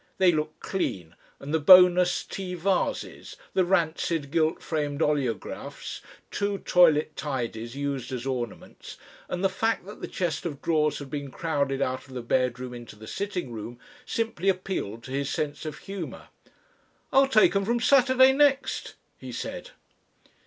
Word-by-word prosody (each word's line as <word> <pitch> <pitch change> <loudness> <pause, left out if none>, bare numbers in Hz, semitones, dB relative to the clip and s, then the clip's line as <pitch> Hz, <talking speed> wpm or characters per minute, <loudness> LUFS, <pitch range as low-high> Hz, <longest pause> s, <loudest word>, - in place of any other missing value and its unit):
They 185 -2 +5
looked 155 -1 -3
clean, 90 - -3 0.2
and 145 +2 -6
the 160 - +3
bonus 180 +2 +7
tea 185 -2 -5
vases, 185 +2 -2 0.2
the 185 - +3
rancid, 165 -4 0
gilt 160 0 +1
framed 145 -3 -2
oleographs, 140 -9 -2 0.3
two 200 0 -1
toilet 160 -5 +4
tidies 120 -4 -4
used 140 -3 -3
as 125 -1 -4
ornaments, 125 -4 -5 0.3
and 180 +1 -3
the - - +5
fact 225 +1 -1
that 205 - -11
the - - -4
chest 170 -5 -2
of 150 -5 -4
drawers 150 -2 +1
had 140 -2 -9
been 145 -2 -4
crowded 140 -3 -1
out 130 +2 -3
of 130 - -12
the 125 - -4
bedroom 125 0 0
into 120 -3 -10
the 110 +1 -12
sitting 185 - -4
room, 115 +2 -7 0.3
simply 225 -5 -1
appealed 185 - -2
to 130 - -9
his 140 +1 -1
sense 150 +1 -3
of 155 - -6
humour. 195 -4 -7 0.8
"I'll 270 0 +6
take 215 -6 +4
'em 195 - +2
from 235 +3 +1
Saturday 260 0 +5
next," 280 -1 +1 0.2
he - - -8
said. - - -6
155 Hz, 155 wpm, -26 LUFS, 135-190 Hz, 0.8 s, bonus